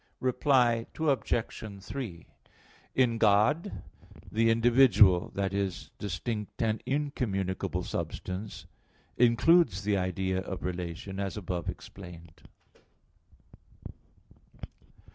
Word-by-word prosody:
Reply 125 -3 +2
Obj. 115 -8 -1
3: 100 -7 -6 0.7
In 120 -3 +2
God 110 - +2 0.5
the 115 +1 +3
individual 115 -5 +5
i.e. 100 0 0 0.3
distinct 105 +1 -4
and 110 -1 0
incommunicable 95 -10 -2
substance 95 +4 -5 0.5
includes 120 - +4
the 105 -1 +1
idea 95 0 -1
of 95 -5 -6
relation, 90 +2 -5
as 100 +1 -3
above 90 -3 -3
explained. 85 -3 -10
105 Hz, 80 wpm, -29 LUFS, 95-120 Hz, 0.7 s, individual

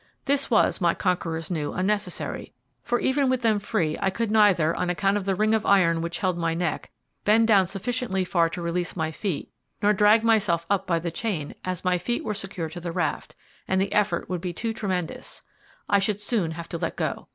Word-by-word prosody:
This 280 0 +1
was, 225 -4 +3
my 170 -1 +3
conquerors 165 -3 -2
knew, 150 -4 -2
unnecessary, 205 +3 -2 0.3
for 240 - 0
even 265 0 +1
with 255 -2 0
them 220 -2 +3
free 175 -7 -1
I 195 - +2
could 220 +3 -2
neither, 195 -7 +4
on 180 - -1
account 195 +3 +1
of 205 -2 -2
the 195 -1 +1
ring 215 +3 +2
of 220 -1 +2
iron 170 -5 +3
which 170 0 -3
held 185 -3 -1
my 165 -1 0
neck, 170 -2 -2 0.3
bend 220 +2 +4
down 195 -4 +5
sufficiently 195 0 -2
far 170 -2 +2
to 170 +1 -5
release 170 +1 -2
my 160 -2 -1
feet, 175 -1 -4 0.3
nor 210 +1 +3
drag 210 +2 +5
myself 205 -7 +2
up 200 - +1
by 170 -2 +2
the 170 0 -3
chain, 165 -6 -3
as 185 0 -4
my 180 -1 +2
feet 240 +6 -2
were 210 - -2
secured 190 -5 -5
to 175 - -7
the 170 0 -4
raft, - - -2 0.3
and 190 - +1
the 195 +1 0
effort 210 0 +1
would 180 -2 -3
be 180 -1 -3
too 225 +5 -3
tremendous 185 -6 -4 0.4
I 200 - +4
should 200 +1 0
soon 205 -5 0
have 170 0 -6
to 170 - -4
let - - -2
go. - - -3
190 Hz, 215 wpm, -25 LUFS, 170-210 Hz, 0.4 s, down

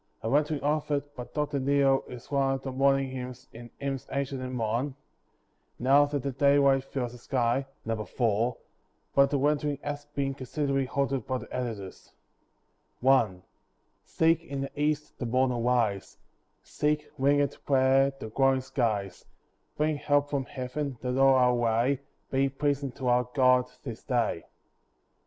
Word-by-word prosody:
A 110 - -1
rendering 150 +1 +1
of 150 +1 0
it 145 0 -2
by 125 - -6
Dr. 150 0 -2
Neale 135 0 +3
is 125 +2 -11
one 135 -1 +2
of 135 - -7
the 135 - -4
morning 135 0 +2
hymns 125 -1 -7
in 120 +1 -10
"Hymns 135 -2 -4
Ancient 140 -1 -2
and 130 0 -4
Modern," 120 +4 -1 0.8
"Now 140 +4 +5
that 145 -3 -3
the 140 - -1
daylight 140 0 +3
fills 125 -3 -3
the 125 - -12
sky" 125 +2 0 0.2
(No. 110 -1 -2
4); 115 +1 0 0.6
but 140 0 +5
the 145 - +1
rendering 145 +1 +1
has 145 0 -4
been 140 -2 -2
considerably 135 0 -1
altered 135 -3 -1
by 130 - 0
the - - -8
editors. 110 -7 -6 0.9
I 110 -9 +4 0.6
See 160 0 +2
in 165 -4 -3
the 135 - -4
east 150 0 -1
the 125 - -2
morn 130 +2 +2
arise; 120 -4 0 0.5
Seek, 150 0 -1
wingèd 140 +1 +2
prayer, 135 0 +4
the 110 - -6
glowing 135 +2 +2
skies; 110 -8 -2 0.5
Bring 150 0 +1
help 145 0 +1
from 140 -2 -1
Heaven, 130 +2 -4
that 125 0 -2
all 135 0 +5
our 125 -1 +4
way 120 +3 +1 0.3
Be 135 +1 +2
pleasing 140 0 -1
to 130 -2 -5
our 125 0 +3
God 125 -2 +4
this 115 -5 -7
day. 120 - -1
135 Hz, 155 wpm, -28 LUFS, 125-140 Hz, 0.9 s, Now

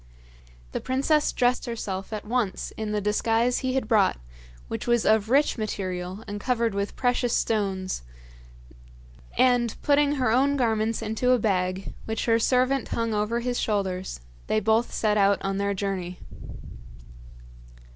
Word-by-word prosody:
The - - -3
princess 280 +4 +1
dressed 250 0 +1
herself 200 -5 -4
at 215 -1 -5
once 225 -3 -2
in 220 -1 -4
the 210 - 0
disguise 225 +4 +1
he 260 -1 -1
had 265 -5 0
brought, 210 - +3 0.5
which - - -5
was 240 -1 +2
of 220 0 +3
rich 275 -1 +3
material 185 -2 -4
and 205 0 -5
covered 235 -3 0
with 200 0 -3
precious 245 -1 +1
stones; 195 -4 -1 1.4
and, 245 -3 +3
putting 290 0 +3
her 255 -5 +1
own 275 +4 +3
garments 225 -2 0
into 225 +4 +1
a - - +4
bag, 185 -3 -1
which 220 0 -2
her 230 -1 +3
servant 255 +2 +2
hung 230 -1 -1
over 210 +3 0
his 245 0 -1
shoulders, 190 - -2 0.3
they 215 - +2
both 220 +3 +1
set 210 -1 +1
out 200 -1 +4
on 195 0 -1
their 200 0 0
journey. 185 -2 -3
220 Hz, 145 wpm, -26 LUFS, 200-245 Hz, 1.4 s, a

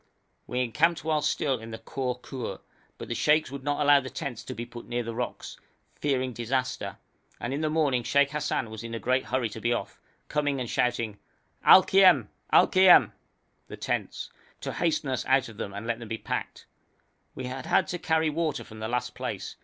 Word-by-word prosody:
We 125 +1 -1
encamped 150 +8 +1
while 155 -1 +1
still 135 -4 0
in 115 0 -9
the 110 - -6
Khor 125 +1 -4
Khur, 130 -3 -6 0.4
but - - -8
the - - -2
sheikhs 150 -2 +2
would 140 -1 -7
not 145 +1 -1
allow 145 0 +6
the 130 -1 -6
tents 130 -1 -5
to - - -6
be 120 +2 -5
put 120 0 -11
near 120 0 -2
the 115 0 -5
rocks, 125 +1 -5 0.4
fearing 130 -3 -1
disaster, 125 +2 -2 0.4
and 120 +3 -3
in 145 - -2
the 155 - +1
morning 150 -5 +2
Sheikh 140 +3 +2
Hassan 150 -6 -2
was 110 0 -7
in 115 0 -5
a - - -4
great 130 +2 +1
hurry 130 -3 0
to 110 +1 -8
be 120 - +1
off, 120 - -3 0.3
coming 145 -2 0
and 125 - -3
shouting 115 -4 -1 0.4
'Al 185 - +9
khiem! 190 -2 +5 0.2
Al - - +7
khiem!' 185 -1 +7 0.6
('the - - -9
tents!') - - -3 0.3
to - - -4
hasten 165 -4 0
us 130 - -1
out 130 0 +3
of 110 - -13
them 100 - -4
and 100 +3 -7
let 115 0 -2
them 115 - -8
be 115 - -2
packed. - - -5 0.7
We 130 - -5
had 130 +1 -5
had - - +3
to 175 - -3
carry 160 -1 +1
water 155 -2 -1
from 110 -1 -12
the 110 - -3
last 125 +1 -2
place. - - -5
130 Hz, 210 wpm, -27 LUFS, 120-150 Hz, 0.7 s, Al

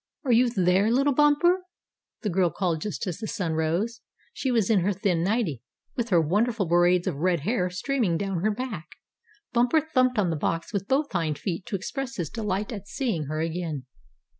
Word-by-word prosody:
"Are 255 - +2
you 240 +1 +5
there, 190 -1 +2
little 275 +4 +3
Bumper?" 295 +6 +4 0.6
the 210 - 0
girl 180 0 +3
called 170 -3 -1
just 210 - -3
as 180 -4 -4
the 220 - -4
sun 175 -6 -2
rose. 170 +9 -1 0.3
She 265 - -2
was 230 -4 +2
in 210 - +5
her 195 +3 +1
thin 180 -3 0
nightie, 190 - 0 0.3
with 240 -1 -2
her 175 -4 +5
wonderful 205 +7 +1
braids 175 +1 +3
of 175 -7 -2
red 175 0 +1
hair 185 - 0
streaming 205 -1 0
down 195 -2 -2
her 215 - +2
back. 210 -8 -4 0.7
Bumper 245 +5 +4
thumped 255 -5 +1
on 190 -5 +2
the - - -1
box 165 +5 -2
with 200 -1 -2
both 285 +2 +1
hind 160 -5 -1
feet 175 +2 -4
to - - -2
express 265 +7 -4
his 170 -6 -3
delight 210 -2 -2
at 200 -2 -7
seeing 225 - -2
her 155 +2 -3
again. 165 -5 -3
195 Hz, 195 wpm, -26 LUFS, 170-240 Hz, 0.7 s, you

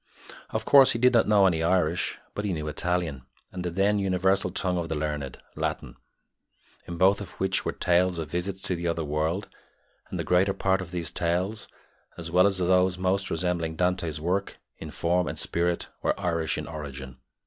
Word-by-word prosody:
Of - - -3
course, 135 -2 +7
he - - -1
did 125 +2 +4
not 115 - +4
know 105 -2 +5
any 85 -4 +2
Irish, 85 -1 +1 0.2
but 100 - -4
he 100 -3 -1
knew 75 -2 -4
Italian 85 -2 -2 0.3
and 90 -1 -5
the 90 - -1
then 100 +4 +2
universal 95 0 +1
tongue 90 -1 -1
of 85 -1 -4
the 80 - -1
learned 75 -3 -3 0.2
Latin, - - -3 0.9
in 85 - -5
both 95 +3 +4
of 95 - -8
which 95 0 0
were - - 0
tales 90 0 +2
of 80 -2 -5
visits 90 +2 -3
to 90 - -1
the 85 0 -3
other 85 -1 -1
world; 80 +6 -1 0.6
and - - -4
the - - -2
greater 95 +2 +3
part 95 -1 +1
of 90 - -7
these 85 -3 -3
tales, 90 +6 -1 0.5
as 85 -1 -6
well 90 +3 +5
as 100 -2 0
those 90 0 +3
most 95 +1 0
resembling 85 -1 -1
Dante's 85 -3 0
work 90 +5 -1 0.2
in - - -7
form 90 +1 0
and - - -4
spirit, 85 0 -1
were - - 0
Irish 85 -4 -1
in - - -4
origin. 70 -4 -8
90 Hz, 190 wpm, -27 LUFS, 85-95 Hz, 0.9 s, course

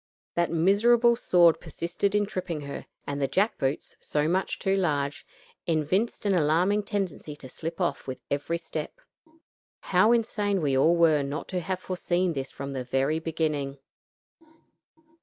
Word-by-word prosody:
That 170 0 +1
miserable 225 +8 +4
sword 175 -7 +4
persisted 185 +4 -2
in 205 0 +3
tripping 185 -6 -4
her, 140 0 -7 0.2
and 145 0 -3
the 135 - +2
jack 205 +9 +1
boots, 135 +2 -2
so 150 0 -1
much 185 +3 0
too 195 0 +1
large, 145 -7 -1 0.4
evinced 170 +9 0
an 200 - +3
alarming 175 +5 +3
tendency 195 -7 -3
to 140 - -10
slip 165 +6 -6
off 175 - -1
with 130 - -5
every 145 +4 -1
step. 170 - -6 0.8
How 190 +5 +3
insane 210 -4 +1
we 145 -5 +1
all 160 +6 +4
were 160 -3 +4
not 140 +3 -4
to 185 - -1
have 185 +2 -3
foreseen 180 -1 -1
this 135 -2 -4
from 140 0 -6
the 130 -1 -3
very 135 +5 0
beginning. 150 -4 -2
170 Hz, 155 wpm, -27 LUFS, 145-195 Hz, 0.8 s, miserable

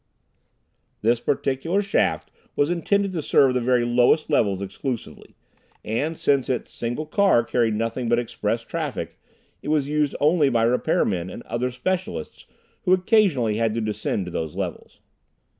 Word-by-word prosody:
This 115 +2 +3
particular 145 +10 0
shaft 195 - 0 0.2
was 145 +3 +2
intended 200 +3 +1
to 170 -4 -3
serve 135 -2 +4
the 125 - 0
very 120 0 +2
lowest 125 +6 +3
levels 100 -9 +2
exclusively, 110 +5 -6 0.5
and 150 +9 -2
since 140 -2 +1
its 125 -2 -2
single 120 +6 -3
car 190 - +3
carried 115 -2 +1
nothing 115 +2 -2
but 120 - +3
express 115 -1 -2
traffic, 140 - -4 0.4
it - - -9
was 150 -2 +1
used 150 -1 0
only 150 -1 +3
by 115 -3 +2
repair 120 +2 +2
men 90 -2 -2
and 120 - -9
other 125 +2 -2
specialists 180 +9 -4 0.3
who 185 - +3
occasionally 180 - +2
had 115 -1 0
to 115 - -1
descend 105 -3 -2
to 90 - -7
those 80 -2 -4
levels. - - -6
125 Hz, 155 wpm, -23 LUFS, 115-155 Hz, 0.5 s, serve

